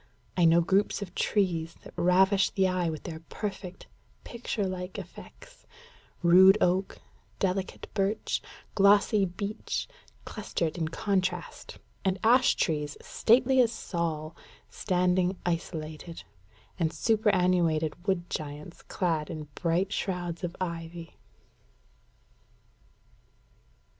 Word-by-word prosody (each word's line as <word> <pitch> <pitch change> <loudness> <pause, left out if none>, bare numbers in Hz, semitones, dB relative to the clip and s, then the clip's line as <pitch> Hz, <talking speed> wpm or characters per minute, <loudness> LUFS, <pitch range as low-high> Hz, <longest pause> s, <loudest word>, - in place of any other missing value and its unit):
I 175 - +4
know 165 +1 +6
groups 195 +4 +1
of 185 -3 -10
trees 170 -7 0
that - - -12
ravish 190 +2 +4
the 190 -1 +2
eye 180 -2 0
with 155 -1 -6
their 160 -3 -6
perfect, 190 -3 -6 0.4
picture 230 -3 -3
like 185 0 -5
effects: - - -12 0.6
rude 190 +3 +8
oak, 185 +1 +1 0.4
delicate 190 0 -2
birch, 200 +1 -1 0.3
glossy 200 +1 +4
beech, 200 +4 -4 0.4
clustered 175 -6 -3
in 160 - 0
contrast; 185 0 -2 0.3
and 190 0 +1
ash 245 +3 +5
trees, 150 -3 -1
stately 255 +3 +3
as 235 -2 +2
Saul, 165 -6 -3 0.4
standing 180 0 +1
isolated; 165 -1 -4 0.6
and 160 -2 +1
superannuated 180 -7 +1
wood 180 -3 0
giants 150 +3 -6
clad 165 -5 -2
in 155 -2 -7
bright 180 +5 0
shrouds 175 -2 -3
of 175 0 -3
ivy." 170 -2 -6
180 Hz, 105 wpm, -28 LUFS, 165-195 Hz, 0.6 s, rude